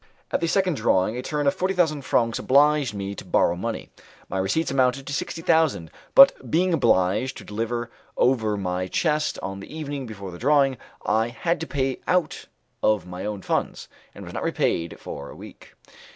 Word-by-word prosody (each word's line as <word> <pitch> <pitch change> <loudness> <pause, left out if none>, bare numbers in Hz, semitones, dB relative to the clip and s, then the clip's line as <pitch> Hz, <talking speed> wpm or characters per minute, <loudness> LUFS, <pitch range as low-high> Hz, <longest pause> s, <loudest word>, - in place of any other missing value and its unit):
At - - 0
the 170 - +1
second 185 -3 +1
drawing 95 +4 +2
a 125 - -3
terne 145 +2 -2
of 140 - +3
forty 190 +1 -1
thousand 155 -5 +1
francs 115 -3 +1
obliged 145 -3 +3
me 100 0 -4
to - - -8
borrow 85 - +2
money. 115 +6 -5 0.4
My 95 - -2
receipts 100 +13 0
amounted 135 0 +1
to 145 - -5
sixty 165 +4 -4
thousand, 160 - +2 0.2
but 275 0 +7
being 180 +3 +2
obliged 105 - +2
to - - -9
deliver 120 +2 -3 0.3
over 110 -5 +2
my 90 -1 -2
chest 150 - 0
on 95 0 -5
the 100 - -11
evening 145 -4 -5
before 100 -4 -8
the 85 - -10
drawing, 135 -1 +3 0.3
I 110 +2 +2
had 165 +8 -2
to 165 - -5
pay 135 -2 -1
out 180 -3 0 0.3
of 105 -5 +2
my 90 +1 -7
own 105 -3 -5
funds, - - -2 0.3
and - - -9
was - - -9
not - - -4
repaid 85 -1 -1
for 70 0 -7
a - - -11
week. - - -13
130 Hz, 190 wpm, -24 LUFS, 100-150 Hz, 0.4 s, but